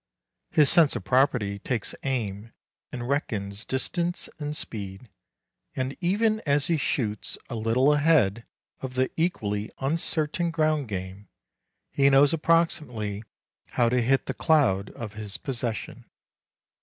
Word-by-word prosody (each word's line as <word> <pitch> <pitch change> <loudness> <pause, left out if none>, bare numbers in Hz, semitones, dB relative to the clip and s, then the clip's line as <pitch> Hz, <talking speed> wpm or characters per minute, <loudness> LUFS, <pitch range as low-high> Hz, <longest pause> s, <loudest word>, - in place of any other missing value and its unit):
His 150 -2 +4
sense 160 -2 +5
of - - -4
property 125 -7 +2
takes 115 0 -3
aim 115 -5 -3 0.4
and 120 -1 -5
reckons 105 -7 -2
distance 170 +6 -1
and 150 0 -3
speed, 100 +1 -6 0.7
and 130 +1 -2
even 215 +5 +2
as 140 -1 +2
he 165 +1 +1
shoots 110 -7 -1
a - - -3
little 115 +6 +3
ahead 145 -8 +3 0.4
of 130 -1 -6
the 130 0 +1
equally 105 - -1
uncertain 155 +3 0
ground 155 -4 +1
game, 95 0 -6 0.6
he 140 0 +4
knows 140 +2 +5
approximately 150 -11 0 0.5
how 120 -1 +3
to 125 +1 +2
hit 130 +3 +2
the - - -3
cloud 120 - +2
of 110 -4 -7
his 105 -2 -4
possession. 120 -6 -4
130 Hz, 130 wpm, -26 LUFS, 105-150 Hz, 0.7 s, sense